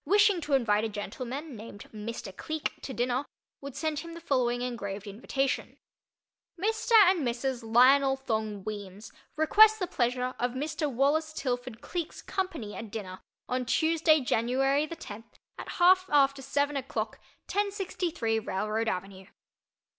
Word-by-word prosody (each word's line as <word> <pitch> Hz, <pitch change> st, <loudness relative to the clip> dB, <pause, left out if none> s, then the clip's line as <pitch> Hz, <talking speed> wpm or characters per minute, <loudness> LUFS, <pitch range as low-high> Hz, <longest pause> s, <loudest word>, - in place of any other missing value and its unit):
wishing 405 Hz, +1 st, +4 dB
to 290 Hz, -1 st, -3 dB
invite 215 Hz, -5 st, +2 dB
a 225 Hz, -, -1 dB
gentleman 250 Hz, +8 st, -5 dB
named 210 Hz, -1 st, -10 dB
Mr. 215 Hz, -3 st, -6 dB
Cleek 315 Hz, +6 st, -3 dB
to -, -, -6 dB
dinner, 250 Hz, +1 st, 0 dB, 0.4 s
would 280 Hz, -2 st, -8 dB
send 310 Hz, -2 st, -1 dB
him 335 Hz, +2 st, -8 dB
the -, -, -7 dB
following 245 Hz, -6 st, 0 dB
engraved 205 Hz, -5 st, -4 dB
invitation: 255 Hz, +6 st, -2 dB, 0.8 s
MR. 445 Hz, +4 st, -1 dB, 0.2 s
AND 375 Hz, -, 0 dB
MRS. 255 Hz, -1 st, -1 dB
LIONEL 265 Hz, +4 st, +5 dB
THONG 215 Hz, -4 st, -2 dB
WEEMS 205 Hz, 0 st, -7 dB, 0.2 s
request 425 Hz, +8 st, +6 dB
the 375 Hz, -, -1 dB
pleasure 250 Hz, -4 st, -1 dB
of 245 Hz, 0 st, 0 dB
MR. 300 Hz, +2 st, -2 dB
WALLACE 295 Hz, +5 st, +1 dB
TILFORD 245 Hz, -5 st, -3 dB
CLEEK'S 345 Hz, -2 st, -5 dB
company 330 Hz, -, -3 dB
at 225 Hz, -, -7 dB
dinner 195 Hz, -4 st, -6 dB, 0.3 s
on 255 Hz, 0 st, -1 dB
Tuesday 315 Hz, +3 st, +3 dB
January 270 Hz, +5 st, +1 dB
the 335 Hz, -, -6 dB
tenth 225 Hz, -5 st, -11 dB, 0.2 s
at -, -, -7 dB
half 370 Hz, +1 st, +5 dB
after 275 Hz, -1 st, +4 dB
seven 285 Hz, +2 st, 0 dB
o'clock 270 Hz, -1 st, -3 dB, 0.3 s
1063 365 Hz, -, -1 dB
Railroad 215 Hz, +2 st, -2 dB
Avenue. 190 Hz, -1 st, -4 dB
260 Hz, 140 wpm, -29 LUFS, 225-315 Hz, 0.8 s, request